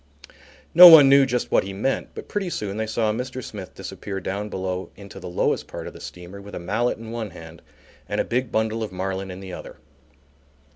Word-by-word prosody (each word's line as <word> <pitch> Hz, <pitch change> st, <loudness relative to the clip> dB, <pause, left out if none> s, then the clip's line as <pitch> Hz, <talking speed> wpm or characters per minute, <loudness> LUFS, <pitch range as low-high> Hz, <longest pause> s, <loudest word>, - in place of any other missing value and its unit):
No 180 Hz, +2 st, +12 dB
one 155 Hz, -5 st, +10 dB
knew 140 Hz, 0 st, +6 dB
just 125 Hz, -1 st, -2 dB
what -, -, +4 dB
he 95 Hz, +1 st, -6 dB
meant, 110 Hz, +8 st, -2 dB
but -, -, -8 dB
pretty 200 Hz, -3 st, -3 dB
soon 105 Hz, -, -4 dB
they 110 Hz, 0 st, -2 dB
saw 110 Hz, -1 st, 0 dB
Mr. 125 Hz, +2 st, -5 dB
Smith 100 Hz, -4 st, -9 dB
disappear 100 Hz, -2 st, -6 dB
down 100 Hz, +3 st, -4 dB
below 95 Hz, -1 st, -4 dB
into 100 Hz, -1 st, -11 dB
the 90 Hz, -1 st, -8 dB
lowest 90 Hz, -, -1 dB
part -, -, -7 dB
of -, -, -8 dB
the -, -, -13 dB
steamer 90 Hz, +3 st, -10 dB
with 100 Hz, +1 st, -10 dB
a -, -, -4 dB
mallet 110 Hz, +8 st, -1 dB
in 115 Hz, 0 st, -9 dB
one 115 Hz, -2 st, -4 dB
hand 80 Hz, -1 st, -12 dB, 0.5 s
and -, -, -2 dB
a -, -, +3 dB
big 125 Hz, 0 st, -2 dB
bundle 110 Hz, +1 st, 0 dB
of 110 Hz, -, -4 dB
marline 95 Hz, +1 st, -4 dB
in 90 Hz, +1 st, -8 dB
the 95 Hz, -2 st, -8 dB
other. -, -, -9 dB
105 Hz, 220 wpm, -23 LUFS, 95-120 Hz, 0.5 s, No